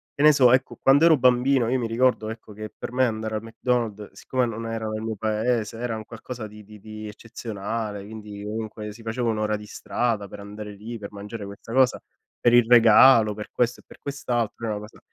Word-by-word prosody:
che - - -3
ne 155 - +9
so 130 -4 +5
ecco 130 +1 +1
quando 140 +4 +6
ero 160 -2 +6
bambino 125 0 +3
io 130 +1 +1
mi 120 - -1
ricordo 115 -1 +1
ecco, 110 -1 -9
che 110 +1 -8
per - - -6
me 130 +1 +3
andare 110 -2 -2
al 105 - -2
McDonald, 115 -2 -2
siccome 130 -1 -1
non 115 -1 -5
ero 115 -1 -3
nel 110 0 -3
mio 110 0 -3
paese, 110 +1 -1
era 120 -1 -2
un 110 0 -7
qualcosa 115 +1 -8
di 105 0 -13
di 105 +1 -14
di 110 +1 -8
eccezionale, 105 -1 -5
quindi 105 -1 -9
comunque 105 0 -5
si 115 - -14
faceva 115 +1 -2
1 110 -1 -1
ora 110 0 0
di 105 - -10
strada 110 0 -2
per 100 - -10
andare 105 +1 -8
lì, 110 +4 -7
per 100 -2 -8
mangiare 105 +1 -7
questa 100 +3 -9
cosa, 130 -1 +3 0.4
per 120 - +3
il 120 -1 +7
regalo, 115 -1 +7
per 105 0 -8
questo 120 0 0
e - - -36
per - - -16
quest'altro, 120 -5 -3
era 110 -2 -1
una 105 - -5
cosa - - -19
110 Hz, 220 wpm, -24 LUFS, 105-120 Hz, 0.4 s, ne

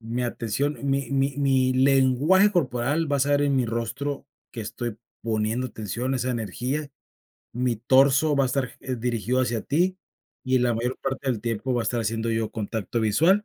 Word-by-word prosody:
Mi 115 +2 -3
atención 120 +5 -2
mi 140 0 -1
mi 135 0 +1
mi 135 -2 +2
lenguaje 135 +9 +4
corporal 145 -1 0
va 140 - +2
a - - -1
estar 145 +1 +2
en 140 -1 +2
mi 125 -2 +1
rostro 135 +5 -3 0.3
que 115 - -6
estoy 110 +1 -5 0.3
poniendo 115 +2 -1
atención 115 +3 -4
a - - +1
esa 125 +1 -1
energía. 125 - -3 0.7
Mi 125 -1 0
torso 135 +6 +4
va 140 - +3
a - - +1
estar 130 -1 -1
g 130 -1 -4
dirigido 120 +1 0
hacia 120 -3 -1
ti, 180 +5 +1 0.5
y 130 0 +3
la 120 -1 +2
mayor 125 +3 -2
parte 135 0 -3
del 110 -4 -2
tiempo 115 +3 -2
va 120 - +1
a - - -6
estar 120 +2 -1
haciendo 115 +1 -1
yo 110 -1 -1
contacto 110 +1 -3
visual, 165 - +3
125 Hz, 190 wpm, -25 LUFS, 115-140 Hz, 0.7 s, lenguaje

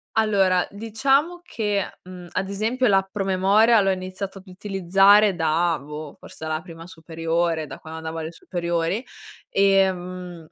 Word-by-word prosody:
Allora, 195 -5 +2
diciamo 270 +11 0
che, 210 - -3
mhmm, 180 -1 -10
ad 190 +1 -2
esempio 225 +6 0
l'app 195 -1 +2
promemoria 200 +3 +3
l'ho 195 -1 +2
iniziato 190 +1 -5
ad 190 - -20
utilizzare 195 +1 +3
da, 165 0 +1
boh, 150 +1 -8
forse 160 - -10
a - - -4
la 155 0 -2
prima 165 -2 -11
superiore, 165 -1 -2
da - - -9
quando 160 0 -9
andavo 160 0 -6
alle 160 +1 -5
superiori. 170 +5 -2 0.4
Ehm, 185 -3 0
185 Hz, 145 wpm, -23 LUFS, 165-200 Hz, 0.4 s, promemoria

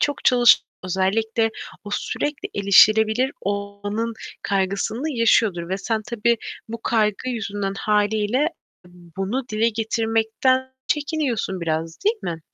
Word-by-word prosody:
çok 290 -1 -1
çalışan, 245 -2 +6 0.2
özellikle 220 +5 +1 0.3
o 205 - -7
sürekli 290 +7 -3
erişilebilir 220 +5 +5
olmanın 205 +3 -3 0.3
kaygısını 200 +8 -1
yaşıyordur 225 -8 +2
ve 190 +2 -2
sen 220 +1 -2
tabii 235 0 +1 0.3
bu 230 +1 -6
kaygı 215 +2 0
yüzünden 205 -4 -3
hâliyle 210 +5 +1 0.4
bunu 190 +8 -5
dile 220 +2 +2
getirmekten 225 +3 0
çekiniyorsun 285 - -1
biraz, 165 0 -2
değil 440 +3 +3
mi? 165 -1 -4
220 Hz, 110 wpm, -22 LUFS, 200-235 Hz, 0.4 s, çalışan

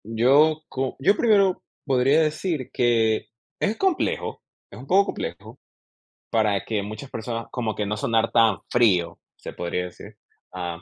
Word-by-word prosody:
Yo 140 +8 +3
co 130 0 -3
yo 195 +10 +3
primero 200 -5 +3 0.2
podría 135 +2 +3
decir 155 -2 -2
que 115 -2 +2 0.3
es 210 +2 0
complejo, 380 -3 -1 0.3
es - - -11
un 135 - -11
poco 195 +4 +4
complejo - - -6 0.7
para 105 -3 +1
que 105 -3 -2
muchas 110 +6 -8
personas, 115 0 -5
como 115 -4 -2
que 105 - -2
no 105 +1 -2
sonar 115 +1 0
tan 115 -4 +4
frío, 90 -8 +2 0.2
se - - -9
podría 90 +1 -3
decir, 90 - -12 0.3
am, 85 -2 -5
120 Hz, 150 wpm, -24 LUFS, 105-150 Hz, 0.7 s, poco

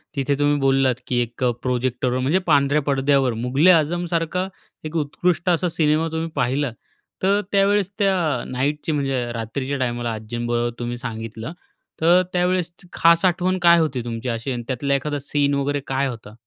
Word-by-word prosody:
तिथे 140 +1 0
तुम्ही 145 0 +2
बोललात 135 -2 +3
की 125 - 0
एक 120 +2 -5 0.2
प्रोजेक्टरवर 125 0 -1
म्हणजे 145 +9 +2
पांढऱ्या 145 -1 +3
पडद्यावर 135 -2 +2
मुघल-ए-आझमसारखा 165 +5 +2 0.4
एक 155 +2 -6
उत्कृष्ट 170 +3 0
असा 175 +1 +2
सिनेमा 160 -1 +1
तुम्ही 160 0 -3
पाहिला. 135 0 0 0.5
तर 200 +2 +3
त्यावेळेस 200 -1 +2
त्या 195 -1 +3 0.4
नाईटची 145 +5 -1
म्हणजे 135 -4 -1
रात्रीच्या 130 +5 -3
टायमाला 120 -2 -1
आजींबरोबर 120 +2 -2
तुम्ही 120 0 -3
सांगितलं, 115 +1 -6 0.5
तर 175 +3 +5
त्यावेळेस 180 -1 +1 0.2
खास 170 +2 +4
आठवण 185 +1 +1
काय 170 0 +6
होती 150 -6 0
तुमची 115 +1 -4
अशी? 115 +3 -3
आणि 120 -2 -4
त्यातला 140 +2 -1
एखादा 145 +2 -2
सीन 145 0 0
वगैरे 140 +1 0
काय 135 +1 0
होता? 115 -4 -8
140 Hz, 150 wpm, -22 LUFS, 125-165 Hz, 0.5 s, काय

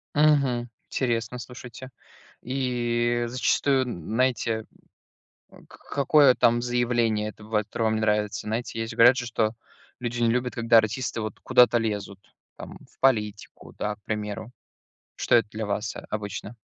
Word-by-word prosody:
Мгм, 140 -5 +3 0.2
интересно. 120 -1 -1
Слушайте, 125 +1 -10 0.5
и 120 -2 0
зачастую, 130 +2 +1
н 120 -10 -5
знаете, 115 -2 0 0.8
э, - - -18
к - - -16 0.2
какое 140 -1 +5
там 120 0 +3
заявление, 120 -3 0
это 105 0 -11
бывает, 105 -1 -1
которое 115 - -3
вам 110 0 +2
не - - -1
нравится? 105 -1 0
Знаете, 115 +1 -3
есть 115 0 -3
же 115 - -8
говорят 120 +2 +7
же, 125 -2 -3
что 110 -2 0 0.5
люди 120 0 -3
не 115 -1 +3
любят, 125 +1 -1
когда 115 -1 +4
артисты 115 +2 -1
вот 110 0 -5
куда-то 120 -1 +5
лезут, 105 -3 -3 0.4
там - - -10
в - - -30
политику, 105 -6 -1
да 105 0 -2
к 105 - -36
примеру. 105 +1 -4 0.7
Что - - +3
это 115 -2 +2
для 110 +1 -4
вас, 105 +2 -3
э, - - -8
обычно? 105 +1 -5
115 Hz, 160 wpm, -25 LUFS, 110-125 Hz, 0.8 s, говорят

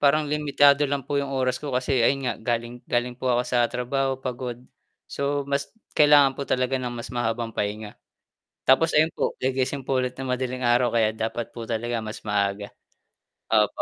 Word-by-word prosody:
parang 150 +2 +4
limitado 145 -1 +3
lang 140 -2 -2
po 140 0 0
'yong 140 - -4
oras 130 -1 0
ko 150 - -6
kasi 130 0 +1
ayun 135 +3 +2
nga 125 - 0
galing, 120 +1 -2
galing 120 +1 0
po 125 +1 -4
ako 120 0 +3
sa 120 -1 +2
trabaho, 135 +2 -1
pagod. 125 -2 -5 0.5
So, 140 0 -2
mas 140 0 -2 0.2
kailangan 145 -2 +6
po 140 +1 -6
talaga 130 +1 0
ng 125 - -3
mas 120 +1 -7
mahabang 115 -1 -2
pahinga 105 0 -4 0.7
tapos 155 +5 +4
ayun 155 +2 +3
po - - -2
gigising 130 +1 -1
po 135 - -1
ulit 125 0 -3
ng 135 - -5
madaling 125 0 -3
araw, 120 +1 +3
kaya 110 -2 +2
dapat 110 +1 -4
po 115 -2 -8
talaga 115 0 -2
mas 110 0 -8
maaga, 100 -1 0 0.8
opo, 105 -1 +2
125 Hz, 180 wpm, -25 LUFS, 120-140 Hz, 0.8 s, kailangan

